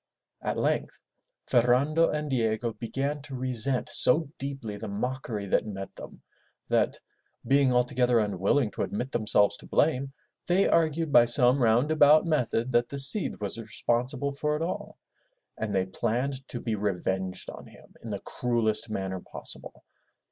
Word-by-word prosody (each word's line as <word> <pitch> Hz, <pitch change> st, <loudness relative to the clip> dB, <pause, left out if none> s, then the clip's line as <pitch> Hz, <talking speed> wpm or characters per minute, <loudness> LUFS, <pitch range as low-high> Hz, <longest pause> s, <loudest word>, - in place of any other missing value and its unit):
At -, -, -2 dB
length -, -, -1 dB, 0.5 s
Ferrando 135 Hz, +7 st, +3 dB
and 150 Hz, 0 st, -2 dB
Diego 115 Hz, -3 st, -1 dB
began 135 Hz, +6 st, -3 dB
to 135 Hz, -1 st, -8 dB
resent 130 Hz, 0 st, +1 dB
so 150 Hz, +2 st, +2 dB
deeply 135 Hz, -6 st, -5 dB
the 105 Hz, +2 st, -7 dB
mockery 110 Hz, 0 st, -4 dB
that 100 Hz, -, 0 dB
met 95 Hz, -2 st, -7 dB
them, -, -, -11 dB, 0.5 s
that, -, -, +1 dB, 0.5 s
being 135 Hz, +1 st, +3 dB
altogether 125 Hz, 0 st, +2 dB
unwilling 105 Hz, +3 st, +1 dB
to -, -, -5 dB
admit 125 Hz, +6 st, -3 dB
themselves 105 Hz, -3 st, +2 dB
to -, -, -13 dB
blame, 140 Hz, -3 st, +1 dB, 0.4 s
they 185 Hz, +3 st, +3 dB
argued 160 Hz, -1 st, +1 dB
by 120 Hz, -3 st, +7 dB
some 125 Hz, +2 st, +3 dB
round 120 Hz, +6 st, +3 dB
about 155 Hz, +1 st, +6 dB
method 130 Hz, -6 st, 0 dB
that 120 Hz, 0 st, +2 dB
the 140 Hz, -, -5 dB
Cid 140 Hz, +9 st, +4 dB
was 105 Hz, +2 st, -4 dB
responsible 125 Hz, +5 st, -2 dB
for 150 Hz, +2 st, -1 dB
it 155 Hz, -, -2 dB
all, 175 Hz, -, -5 dB, 0.6 s
and 105 Hz, -2 st, -3 dB
they 95 Hz, -1 st, +2 dB
planned 125 Hz, +7 st, -2 dB
to 120 Hz, -, -6 dB
be 115 Hz, -, -3 dB
revenged 95 Hz, -2 st, -2 dB
on -, -, -11 dB
him -, -, -17 dB
in 115 Hz, -, -7 dB
the 100 Hz, -2 st, -4 dB
cruellest 115 Hz, -2 st, 0 dB
manner 95 Hz, -3 st, -3 dB
possible. -, -, -9 dB
125 Hz, 155 wpm, -27 LUFS, 110-140 Hz, 0.6 s, by